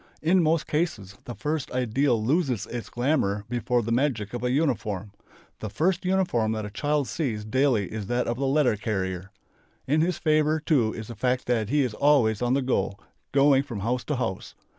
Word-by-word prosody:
In 180 +3 +4
most 160 0 +2
cases 115 - -2
the 120 - -6
first 150 +7 -2
ideal 125 -1 +1
loses 135 - +1
its 120 -1 -6
glamour 120 -6 0
before 120 0 0
the 115 - -3
magic 115 -5 0
of 120 - -4
a 125 - +1
uniform. 110 - -1 0.5
The 110 - -5
first 175 - 0
uniform 180 -13 +1
that 110 -1 -3
a 105 - -7
child 145 +3 0
sees 115 -10 -3
daily 125 -4 +1
is 105 -3 -4
that 120 +2 0
of 120 - -2
the 135 +1 -1
"letter 135 -4 +3
carrier." 95 -3 -3 0.6
In 150 +3 +2
his 175 +2 0
favour, 155 -1 +2
too, 140 -8 +2
is 110 0 -7
the 115 - -7
fact 125 +3 0
that 115 -4 0
he 145 +2 +3
is 125 -4 -2
always 125 -6 +3
on 125 +1 +2
the 140 - +1
go, 100 -6 0 0.3
going 140 -1 +5
from 120 -8 -6
house 125 +4 -1
to 150 - -1
house. 110 -7 -4
125 Hz, 195 wpm, -26 LUFS, 110-145 Hz, 0.6 s, going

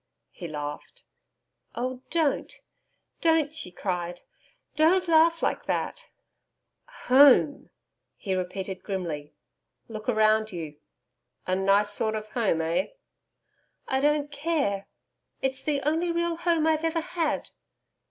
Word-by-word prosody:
He 175 - -8
laughed. 150 - -7 0.7
'Oh 255 +1 -3
don't 320 -4 0 0.7
don't,' 320 -3 +3
she 315 -12 -5
cried. 175 -1 -4 0.5
'Don't 355 +4 +3
laugh 330 0 +4
like - - 0
that.' - - -2 1.0
'Home!' 280 +2 +6 0.5
he 195 - -3
repeated, 185 +1 -4
grimly. 165 -8 -5 0.5
'Look 215 -2 -8
round 220 -2 +3
you. 160 -5 -6 0.7
A 185 - 0
nice 200 +2 +3
sort 220 +1 0
of 215 0 -5
home. 215 -9 +1
Eh?' 165 - 0 1.0
'I 265 0 +1
don't 295 0 +1
care. 285 -10 -1 0.5
It's 265 0 -2
the 290 -1 -1
only 330 +3 +1
real 340 0 0
home 335 -2 +1
I've 315 0 +2
ever 330 0 0
had.' 330 -2 -2
255 Hz, 115 wpm, -27 LUFS, 190-320 Hz, 1.0 s, Home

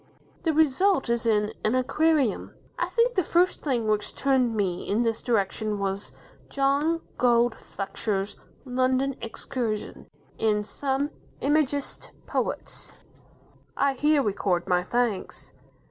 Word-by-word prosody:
The 325 - +1
result 315 +1 +3
is 235 0 0
in 210 -1 +2
"An 215 +3 +2
Aquarium". 285 -1 +1 0.2
I - - +1
think 475 +1 +2
the 370 - +2
first 350 +3 +2
thing 245 -6 0
which 210 -1 0
turned 260 -4 +2
me 185 -4 -1
in 215 +4 +2
this 225 -1 -1
direction 215 -1 0
was 195 0 -3 0.4
John 285 +4 +1 0.2
Gould 240 -1 +4
Fletcher's 200 0 -4 0.3
"London 260 +1 +1
Excursion", 230 -1 -4 0.3
in 210 -1 +2
"Some 275 +5 -2 0.3
Imagist 285 -1 0 0.2
Poets". - - -3 0.8
I 280 -1 +3
here 295 +2 +3
record 190 -4 0
my 180 -1 +3
thanks. 235 -1 -2
245 Hz, 120 wpm, -26 LUFS, 210-280 Hz, 0.8 s, Gould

